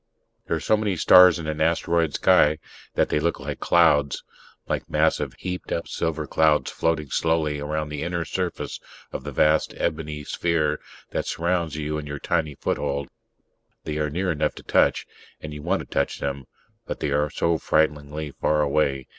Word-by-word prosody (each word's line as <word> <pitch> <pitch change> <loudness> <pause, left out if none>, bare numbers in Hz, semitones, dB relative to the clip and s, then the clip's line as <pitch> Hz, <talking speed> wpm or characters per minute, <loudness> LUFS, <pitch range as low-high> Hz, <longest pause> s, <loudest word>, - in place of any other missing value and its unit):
There - - 0
are - - -4
so 110 - +2
many 105 -3 -1
stars 90 +1 +7
in 85 - -6
an 80 0 -3
asteroid 80 -1 +1
sky 75 +1 +4 0.4
that - - +2
they - - +1
look 85 +3 0
like - - -5
clouds; 75 -5 +3 0.4
like - - -3
massive, - - +1
heaped 90 0 -5
up 85 - -2
silver 80 -2 -2
clouds 75 +1 +2
floating 80 -3 -1
slowly 80 -3 +1
around 75 +1 -3
the 75 -1 -5
inner 85 0 -2
surface 90 -2 -3 0.3
of - - -5
the 75 - -5
vast 75 +3 +2
ebony 75 -2 -3
sphere 75 -1 0 0.3
that - - -2
surrounds 85 -2 -1
you 75 0 -2
and 75 - -7
your 75 0 -5
tiny 75 +1 -1
foothold. 70 0 -2 0.7
They 75 0 -3
are 75 -1 0
near 90 +5 -1
enough 75 -1 -1
to - - -11
touch, - - +2 0.3
and 75 -1 -7
you 75 - -7
want 90 +5 0
to - - -8
touch - - -1
them, 70 -2 -4 0.4
but - - -4
they 70 - -1
are 75 +1 +1
so 85 +2 0
frighteningly 75 -1 0
far 75 +2 +1
away 70 -2 0
75 Hz, 180 wpm, -24 LUFS, 75-85 Hz, 0.7 s, stars